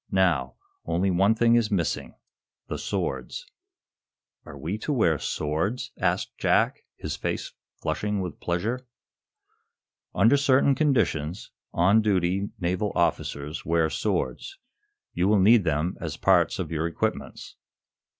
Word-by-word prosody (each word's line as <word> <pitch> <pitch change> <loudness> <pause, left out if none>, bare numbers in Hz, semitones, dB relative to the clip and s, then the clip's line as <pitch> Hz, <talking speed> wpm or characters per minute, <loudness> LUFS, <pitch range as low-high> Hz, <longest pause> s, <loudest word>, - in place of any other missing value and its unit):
Now, 85 -9 +1 0.3
only 90 +3 0
one 100 +5 +3
thing 115 +1 +3
is 115 -2 +3
missing 90 -6 -2 0.5
the - - -4
swords." 65 -2 -3 1.0
"Are 70 - -10
we 85 +10 -4
to 150 - -3
wear 85 - +2
swords?" 80 +11 -2
asked - - -1
Jack, - - +2 0.2
his - - -5
face - - -4 0.2
flushing 105 -1 -2
with 90 -5 -5
pleasure. 110 +9 -2 1.3
"Under 115 +9 +5
certain 140 0 +4
conditions, 105 - 0 0.2
on 95 +6 +4
duty, 95 -1 +1
naval 95 +4 -1
officers 75 -3 -1
wear 80 -1 +1
swords. 110 - -2 0.6
You 90 +2 +1
will 105 0 +4
need 105 +1 +5
them 80 +2 0
as - - -4
parts - - +3
of - - -4
your 80 0 -1
equipments." 85 - -4
95 Hz, 125 wpm, -26 LUFS, 85-110 Hz, 1.3 s, Under